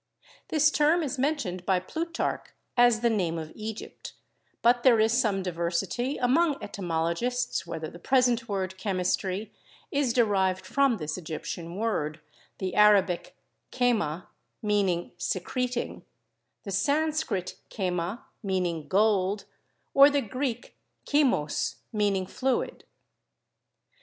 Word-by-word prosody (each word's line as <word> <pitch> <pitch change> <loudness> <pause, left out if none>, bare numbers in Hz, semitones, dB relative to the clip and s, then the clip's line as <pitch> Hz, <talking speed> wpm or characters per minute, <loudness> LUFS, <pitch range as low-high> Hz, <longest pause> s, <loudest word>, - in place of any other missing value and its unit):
This 305 -1 +3
term 315 +3 +3
is 280 -2 -3
mentioned 255 - -1
by 185 -1 +2
Plutarch 330 - -3 0.3
as 240 -2 +5
the 235 - +3
name 175 -6 0
of 160 -1 -6
Egypt, 220 0 -7 0.5
but 240 +1 +5
there 240 -3 +5
is 220 +1 +3
some 215 -6 +1
diversity 180 - -1
among 285 +5 +3
etymologists 175 +6 -2
whether 160 -1 -4
the 170 - -11
present 245 0 +2
word 190 -1 -3
'chemistry' 190 +1 -1 0.4
is 280 -3 +1
derived 195 -6 +2
from 275 -4 +2
this 160 0 -4
Egyptian 165 +1 -6
word; 180 -8 -1 0.4
the 185 -2 -3
Arabic 200 -4 +4 0.4
'kerna/ 210 -10 0 0.4
meaning 195 -5 +1
secreting; 245 +8 -2 0.6
the 200 - -6
Sanskrit 285 - 0
'kerna,' 180 +2 -2 0.2
meaning 180 -6 -1
gold; 200 +2 +2 0.5
or 275 +1 +8
the 285 -1 +1
Greek 250 +1 -4 0.3
'chymos,' 270 - +1 0.2
meaning 200 -3 +1
fluid. 255 +6 -2
210 Hz, 110 wpm, -27 LUFS, 180-250 Hz, 0.6 s, or